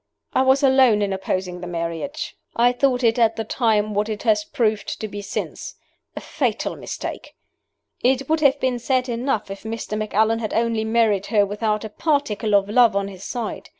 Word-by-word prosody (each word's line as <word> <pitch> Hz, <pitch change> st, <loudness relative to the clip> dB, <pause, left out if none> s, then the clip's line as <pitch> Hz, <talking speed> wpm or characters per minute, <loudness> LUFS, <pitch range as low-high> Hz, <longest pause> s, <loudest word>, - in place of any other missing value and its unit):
"I -, -, +3 dB
was 265 Hz, +1 st, +3 dB
alone 260 Hz, -6 st, +5 dB
in 195 Hz, -1 st, -1 dB
opposing 185 Hz, -1 st, -3 dB
the 180 Hz, -, -6 dB
marriage. 170 Hz, -, -4 dB, 0.2 s
I 240 Hz, +1 st, +4 dB
thought 250 Hz, 0 st, +1 dB
it 230 Hz, +1 st, +3 dB
at 225 Hz, -1 st, +3 dB
the 225 Hz, -, -3 dB
time 215 Hz, -2 st, +1 dB
what 210 Hz, +2 st, 0 dB
it 215 Hz, -1 st, -4 dB
has 215 Hz, -3 st, +3 dB
proved 215 Hz, -1 st, -1 dB
to 215 Hz, -, -3 dB
be 205 Hz, 0 st, -7 dB
since 200 Hz, -, -5 dB, 0.4 s
a -, -, -4 dB
fatal -, -, -2 dB
mistake. -, -, -7 dB, 0.7 s
"It 265 Hz, +2 st, +2 dB
would 315 Hz, 0 st, +2 dB
have 280 Hz, -2 st, +3 dB
been 255 Hz, -2 st, 0 dB
sad 255 Hz, +1 st, 0 dB
enough 235 Hz, -4 st, -2 dB
if 195 Hz, -, -7 dB
Mr. 220 Hz, -1 st, -5 dB
Macallan 215 Hz, +1 st, +1 dB
had 220 Hz, -2 st, -3 dB
only 230 Hz, -1 st, +1 dB
married 220 Hz, -3 st, +2 dB
her 210 Hz, -3 st, +3 dB
without 210 Hz, +1 st, -1 dB
a -, -, -5 dB
particle 225 Hz, -6 st, 0 dB
of 200 Hz, -1 st, +3 dB
love 230 Hz, 0 st, +4 dB
on 200 Hz, 0 st, 0 dB
his 190 Hz, -1 st, -11 dB
side. 235 Hz, +1 st, -5 dB
220 Hz, 190 wpm, -22 LUFS, 205-250 Hz, 0.7 s, alone